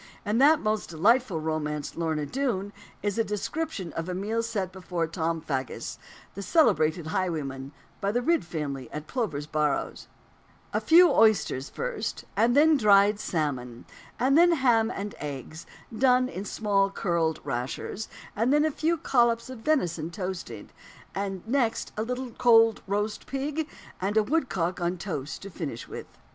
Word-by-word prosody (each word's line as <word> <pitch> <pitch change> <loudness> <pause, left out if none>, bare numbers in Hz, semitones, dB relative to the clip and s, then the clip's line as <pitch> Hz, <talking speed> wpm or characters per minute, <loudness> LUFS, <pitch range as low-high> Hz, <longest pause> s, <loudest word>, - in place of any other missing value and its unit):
In 210 +3 +1
that 295 +3 +6
most 215 0 -1
delightful 200 +3 +2
romance 150 -2 -3
Lorna 160 -3 -1
Doone 210 - -2 0.3
is 205 +1 -1
a - - +4
description 210 - -3
of 165 +2 -4
a 180 - -2
meal 215 +5 -1
set 210 -5 -3
before 180 -2 -3
Tom 165 0 -2
Faggus, 135 -5 -4 0.3
the 200 - -6
celebrated 180 - +3
highwayman, 155 -7 -3 0.3
by 200 - +1
the 245 +3 0
Ridd 335 +3 +2
family, 140 -7 -5
at 150 0 -6
Plover's 170 - -2
Barrows: 150 -1 -1 0.7
"A - - +1
few 345 +2 +7
oysters 215 -11 +3
first, - - -4
and 240 +3 +3
then 310 +1 +6
dried 205 -2 +5
salmon, 130 - -3 0.3
and 260 +3 +3
then 345 +2 +6
ham 240 -7 +3
and 205 -3 -5
eggs, 145 +2 -7 0.3
done 255 +1 +4
in 200 -6 -6
small 200 -2 +1
curled 170 -5 0
rashers, 135 - -4 0.3
and 230 +5 +1
then 295 +1 +4
a 315 - +1
few 325 +4 0
collops 240 -3 +2
of 255 - -8
venison 180 - 0
toasted, 185 -1 -6 0.4
and 195 -1 -4
next 240 -2 0
a 215 - -2
little 250 +2 -3
cold 225 -2 +5
roast 210 +2 -2
pig, 290 +3 -3 0.3
and 200 +3 0
a 215 - +5
woodcock 200 - -1
on 175 +1 0
toast 160 -5 -5
to 200 - -8
finish 145 -9 -5
with." - - -8
200 Hz, 155 wpm, -27 LUFS, 160-245 Hz, 0.7 s, few